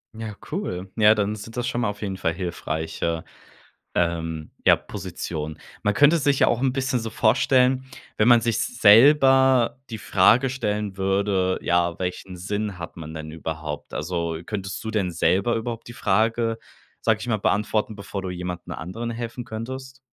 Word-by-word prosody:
Ja, 110 -2 -6 0.2
cool. 95 - -4
Ja, 110 0 +6
dann 105 0 0
sind 110 +3 -9
das 120 0 -2
schon 120 -1 -1
mal 115 - +1
auf 105 0 -7
jeden 95 -3 -3
Fall 80 - 0
hilfreiche, 80 -2 -3 0.7
ähm, 80 -2 -1
ja, - - +7
Positionen. 85 -5 -6 0.2
Man 105 - +2
könnte 145 +8 +5
es 155 - 0
sich 140 -2 +2
ja - - +5
auch 120 - +1
'n 135 - +2
bisschen 130 -1 0
so 115 - -4
vorstellen, 130 +4 +3 0.3
wenn 110 +3 +3
man 120 - +8
sich 115 -1 0
selber 130 +2 +5
die 110 - -5
Frage 110 +7 +4
stellen 105 -6 -2
würde, 95 -1 +1
ja, 85 0 +1
welchen 90 0 -4
Sinn 105 +1 -3
hat 80 - -7
man 80 -2 -8
denn 80 -1 -7
überhaupt? 80 -2 -6
Also, 85 0 -2
könntest 95 -3 -4
du 110 - -4
denn 100 -5 0
selber 95 +7 +2
überhaupt 115 0 -4
die 120 - -8
Frage, 115 +1 +1 0.4
sage 110 -1 +2
ich - - -6
mal, 110 -3 +1
beantworten, 105 +2 0
bevor 100 0 -5
du 95 - -4
jemanden 90 -1 -5
anderen 115 +8 -5
helfen 120 +1 -5
könntest? 130 +4 -7
105 Hz, 175 wpm, -24 LUFS, 90-120 Hz, 0.7 s, man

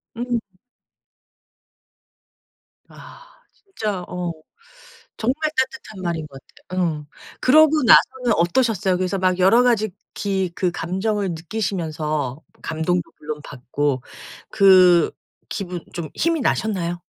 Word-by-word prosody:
음. 240 +1 -1 2.5
아. - - -14 0.3
진짜 215 - -5
어 180 -1 -3 0.9
정말 280 +7 0
따뜻한 260 -6 -2
말인 170 -3 -3
것 135 -2 -12 0.3
같아요. 185 0 0
음. 150 -2 -4 0.4
그러고 310 +3 +5
나서는 250 +1 +5
어떠셨어요? 190 +1 +2
그래서 185 +2 -1
막 185 0 +1
여러 195 +7 +5
가지 225 -3 +2 0.3
기 190 -3 -1
그 185 - +1
감정을 190 +4 -2
느끼시면서 160 - -3 0.2
감동도 165 +2 -1
물론 150 0 -6
받고 135 0 -2 0.5
그 185 -4 +6 0.4
기분 180 -3 -5
좀 170 -3 -5
힘이 330 -2 +1
나셨나요? 180 -8 -1
185 Hz, 220 characters per minute, -22 LUFS, 165-225 Hz, 2.5 s, 그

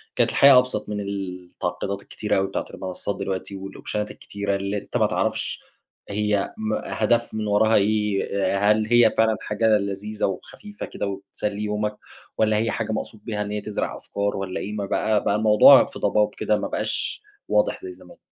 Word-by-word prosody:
كانت - - +3
الحياة 140 -2 +7
أبسط 125 -5 -2
من 105 -1 -3
التعقيدات 100 0 -4
الكتيرة 105 0 -2
أوي 95 0 +1
بتاعة - - -3
المنصات 95 +2 -4
دلوقتي 100 0 -4
والأوبشنات 100 +2 -5
الكتيرة 100 -1 -3
اللي 100 +1 -2
أنت 100 - -4
ما - - +3
تعرفش - - -1 0.5
هي 105 -1 0
م 110 0 -2
هدف 120 +2 0
من 110 -1 -2
وراها 110 +2 +3
إيه؟ 100 -2 +1
هل 110 0 +2
هي 120 -1 +5
فعلًا 110 -1 +3
حاجة 110 +2 0
لذيذة 105 +1 -3
وخفيفة 205 - -6
كده 100 - -4
وبتسلي 100 +1 -4
يومك، 105 0 -2 0.4
والّا 110 -1 +3
هي 115 0 +1
حاجة 110 -1 -2
مقصود 110 -1 -5
بيها 105 -3 -3
إن 105 - -3
هي 105 0 -2
تزرع 105 - -3
أفكار 100 0 -3
والّا 95 -1 -3
إيه، 105 - -5
م 100 -2 -3
بقى 105 0 +1
بقى 100 - +1
الموضوع 105 -1 +7
في - - -10
ضباب 105 0 +1
كده، 105 - +1
ما - - -2
بقاش - - -1 0.3
واضح - - +1
زي 370 -1 -7
زمان. - - -16
105 Hz, 175 wpm, -24 LUFS, 100-110 Hz, 0.5 s, الحياة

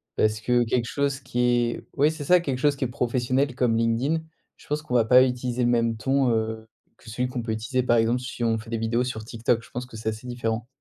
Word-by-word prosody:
Parce 110 0 +1
que 120 +2 +2
quelque 120 +1 0
chose 140 +1 -1
qui 125 -3 -5
est 120 -1 +1
oui 145 +2 +4
c'est 160 -2 -7
ça 180 +4 +5
quelque 135 -6 -2
chose 145 +2 +2
qui 135 - -2
est - - -1
professionnel 125 +1 0
comme 125 -2 +1
LinkedIn, 115 +8 +1 0.4
je - - -20
pense 150 +1 -1
qu'on 150 -5 -4
va 115 -2 +4
pas 125 +2 +7
utiliser 125 -1 -1
le - - +2
même 115 -1 +1
ton, 135 +3 +1
heu, 110 0 -2 0.3
que 115 - -14
celui 125 +3 -1
qu'on 125 -2 -4
peut 115 - -3
utiliser 115 +4 -1
par 120 -1 +3
exemple 115 +2 +2
si 125 -1 -5
on 115 -1 +2
fait 110 +1 -10
des 115 - -1
vidéos 115 +2 0
sur 125 -3 -4
TikTok. 115 +1 0
Je - - -16
pense 125 +1 -5
que 120 -3 -11
c'est 110 0 -2
assez 110 +2 -7
différent. 120 -2 -3
120 Hz, 255 wpm, -25 LUFS, 115-130 Hz, 0.4 s, pas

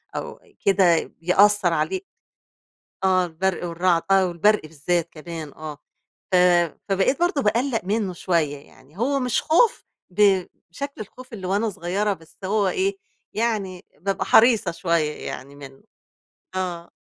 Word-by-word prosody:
أو - - -5 0.3
كده 185 -4 +4 0.2
بيأثر 190 0 +4
عليه. 265 - -1 1.0
آه 185 -1 +3
البرق 175 +2 -2
والرعد 170 0 +1
آه 190 -1 +5
والبرق 205 +5 +2
بالذات 160 +2 -2
كمان 160 -2 -8
آه 155 -2 -8 0.5
ف - - +3 0.5
فبقيت 195 - +2
برضه 350 -5 +1
باقلّق 230 +3 +1
منه 200 -2 -1
شوية 165 -5 0
يعني، 140 +3 -19
هو 275 +3 +1
مش 250 -2 0
خوف 455 +9 +3 0.3
بشكل 200 +6 0
الخوف 250 +4 -11
اللي 190 -4 -6
وأنا 205 +4 +1
صغيرة 195 +3 -1
بس 160 -2 -17
هو 205 0 +1
إيه 390 - 0 0.4
يعني 210 -5 -2
بابقى 195 +3 -2
حريصة 230 -3 +5
شوية 165 -3 0 0.2
يعني 140 +2 -7
منه. 135 -1 -12 0.7
آه 175 -2 -4
185 Hz, 130 wpm, -23 LUFS, 170-215 Hz, 1.0 s, آه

